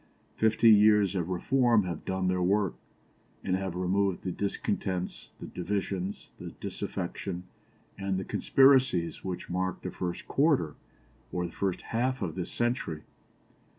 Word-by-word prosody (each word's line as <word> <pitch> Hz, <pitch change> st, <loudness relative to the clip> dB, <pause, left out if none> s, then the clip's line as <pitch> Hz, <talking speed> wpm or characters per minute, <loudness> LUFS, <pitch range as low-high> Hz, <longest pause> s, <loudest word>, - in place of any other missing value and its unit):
Fifty 110 Hz, +1 st, +5 dB
years 105 Hz, -2 st, +6 dB
of 90 Hz, -3 st, -2 dB
reform 115 Hz, +4 st, +3 dB
have 85 Hz, -4 st, -5 dB
done 95 Hz, 0 st, -1 dB
their 90 Hz, 0 st, +1 dB
work, 100 Hz, +1 st, +2 dB, 0.7 s
and 90 Hz, -, +1 dB
have 95 Hz, -2 st, -3 dB
removed 95 Hz, +1 st, 0 dB
the 95 Hz, -, -2 dB
discontents, 95 Hz, -1 st, -3 dB
the -, -, -7 dB
divisions, 95 Hz, +1 st, -3 dB
the -, -, -6 dB
disaffection, 90 Hz, 0 st, -4 dB, 0.6 s
and 95 Hz, -1 st, -1 dB
the 95 Hz, -, -3 dB
conspiracies 130 Hz, -11 st, +3 dB
which 90 Hz, -2 st, -4 dB
marked 95 Hz, +1 st, -2 dB
the -, -, -3 dB
first 90 Hz, -1 st, -4 dB
quarter, 135 Hz, -, +2 dB, 0.6 s
or 90 Hz, 0 st, -1 dB
the 85 Hz, -, -6 dB
first 95 Hz, -3 st, -2 dB
half 125 Hz, +1 st, -1 dB
of 85 Hz, -4 st, -2 dB
this 90 Hz, -2 st, -4 dB
century. 120 Hz, -10 st, -1 dB
95 Hz, 140 wpm, -29 LUFS, 90-105 Hz, 0.7 s, years